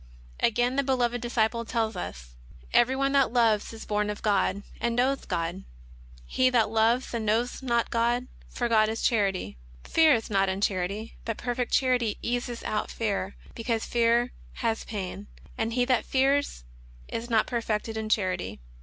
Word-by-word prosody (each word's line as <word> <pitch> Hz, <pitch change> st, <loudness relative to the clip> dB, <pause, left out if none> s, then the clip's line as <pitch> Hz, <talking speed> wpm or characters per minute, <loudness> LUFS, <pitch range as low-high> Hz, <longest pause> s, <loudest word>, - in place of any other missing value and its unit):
Again 245 Hz, +3 st, +2 dB
the 280 Hz, -, +3 dB
Beloved 245 Hz, -3 st, 0 dB
Disciple 230 Hz, -1 st, 0 dB
tells 225 Hz, -2 st, -1 dB
us: 180 Hz, -, -4 dB
xi -, -, -11 dB
xil -, -, -16 dB
FOEEWORD. -, -, -21 dB
" -, -, +9 dB
Every 255 Hz, +2 st, 0 dB
one 275 Hz, +1 st, +1 dB
that 275 Hz, -4 st, +3 dB
loveth 225 Hz, -4 st, +2 dB
is 225 Hz, -1 st, -9 dB
born 210 Hz, 0 st, 0 dB
of 210 Hz, +1 st, -5 dB
God, 200 Hz, -1 st, +1 dB, 0.2 s
and 235 Hz, -1 st, 0 dB
knoweth 265 Hz, +3 st, +1 dB
God. 175 Hz, +1 st, -2 dB, 0.6 s
He 255 Hz, -, +2 dB
that 230 Hz, -4 st, +2 dB
loveth 225 Hz, +4 st, +2 dB
not, 235 Hz, -, -1 dB
knoweth 225 Hz, +5 st, 0 dB
not 235 Hz, -3 st, 0 dB
God; 240 Hz, +2 st, +1 dB, 0.2 s
for 240 Hz, -, -2 dB
God 215 Hz, -2 st, +4 dB
is 225 Hz, +1 st, -3 dB
charity. 195 Hz, -, 0 dB, 0.2 s
Fear 320 Hz, -4 st, +5 dB
is 225 Hz, -, -3 dB
not 195 Hz, -1 st, +3 dB
in 190 Hz, +1 st, -2 dB
charity; 200 Hz, +3 st, -2 dB
but 225 Hz, -2 st, -3 dB
perfect 245 Hz, 0 st, -2 dB
charity 250 Hz, -5 st, +2 dB
casteth 240 Hz, 0 st, -2 dB
out 215 Hz, 0 st, -2 dB
fear, 200 Hz, -3 st, -2 dB, 0.2 s
because 230 Hz, -1 st, -2 dB
fear 235 Hz, +1 st, +2 dB, 0.2 s
hath 225 Hz, -2 st, -2 dB
pain. 200 Hz, -1 st, -5 dB, 0.3 s
And 225 Hz, +1 st, -2 dB
he 245 Hz, 0 st, +2 dB
that 250 Hz, -2 st, +2 dB
feareth 275 Hz, -, +1 dB, 0.4 s
is 235 Hz, +2 st, -5 dB
not 225 Hz, -2 st, +3 dB
perfected 225 Hz, -2 st, -2 dB
in 220 Hz, 0 st, -3 dB
charity. 185 Hz, -, 0 dB
230 Hz, 180 wpm, -27 LUFS, 210-245 Hz, 0.6 s, "